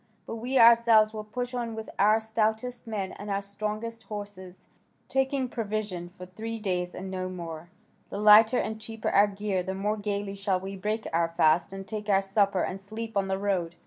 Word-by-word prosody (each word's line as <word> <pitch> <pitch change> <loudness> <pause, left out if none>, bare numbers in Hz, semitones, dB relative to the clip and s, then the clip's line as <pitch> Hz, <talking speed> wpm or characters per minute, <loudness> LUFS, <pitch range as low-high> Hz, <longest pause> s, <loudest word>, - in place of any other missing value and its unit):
But 230 - -5
we 250 +4 -1
ourselves 230 -2 +6
will 215 -1 -5
push 245 +4 -5
on 235 -2 -3
with 220 0 -6
our 215 +2 +5
stoutest 220 +2 -1
men 205 -4 -3
and 205 - -8
our 200 0 -1
strongest 215 +2 -5
horses, 195 -3 -8 0.4
taking 265 0 0
provision 210 -6 -3
for 180 0 -11
three 220 +5 -6
days 180 -4 -2
and 190 +1 -6
no 185 -1 -3
more: 170 -2 -7 0.4
the - - -5
lighter 215 +3 +7
and 220 -1 -2
cheaper 225 0 -4
our 205 +1 +5
gear 200 -2 -2
the 190 +1 -4
more 210 +3 -1
gaily 205 -1 -3
shall 195 -1 0
we 195 +1 -6
break 215 +3 -2
our 165 0 +2
fast 165 +1 +3
and 195 0 -7
take 210 -1 -5
our 195 -1 +4
supper 195 -1 +2
and 195 +1 -4
sleep 220 +3 -7
on 195 -1 +1
the 190 0 0
road. 185 -4 -1
205 Hz, 195 wpm, -28 LUFS, 190-220 Hz, 0.4 s, lighter